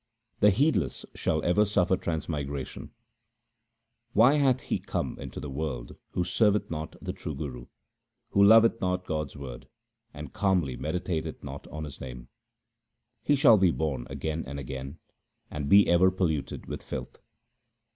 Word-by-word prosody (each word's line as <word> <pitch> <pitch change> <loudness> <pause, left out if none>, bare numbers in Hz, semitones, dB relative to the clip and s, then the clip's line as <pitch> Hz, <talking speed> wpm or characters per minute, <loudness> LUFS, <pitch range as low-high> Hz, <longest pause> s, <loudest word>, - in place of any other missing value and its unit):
The 105 - +6
heedless 110 - +1
shall 80 -1 -1
ever 90 +5 +4
suffer 95 -3 +2
transmigration: 75 -6 -4 0.6
— 115 0 -50
Why 115 +6 +6
hath 130 -3 +3
he - - -2
come - - -3
into - - -7
the - - -6
world 65 -4 -4 0.2
who 90 - 0
serveth 105 +3 +2
not 80 -1 -5
the - - -5
true 75 - -6
Guru, 65 -4 -6 0.6
Who 100 - +4
loveth 115 +2 +6
not 90 0 -1
God's 75 -3 -3
word, 65 -4 -8 0.4
and 75 +1 -9
calmly 95 - +1
meditateth 80 +3 -3
not - - -8
on 80 0 -6
His 75 -3 -8
name? 60 -1 -8 0.9
He 145 - +3
shall 115 -6 +6
be 95 -1 +5
born 75 -7 -2
again 80 +1 -3
and 70 +2 -5
again, 70 +3 -6 0.5
and 75 -1 -4
be 100 0 +7
ever 85 +2 +5
polluted 80 -7 -2
with - - -6
filth. - - -7
80 Hz, 150 wpm, -28 LUFS, 70-100 Hz, 0.9 s, be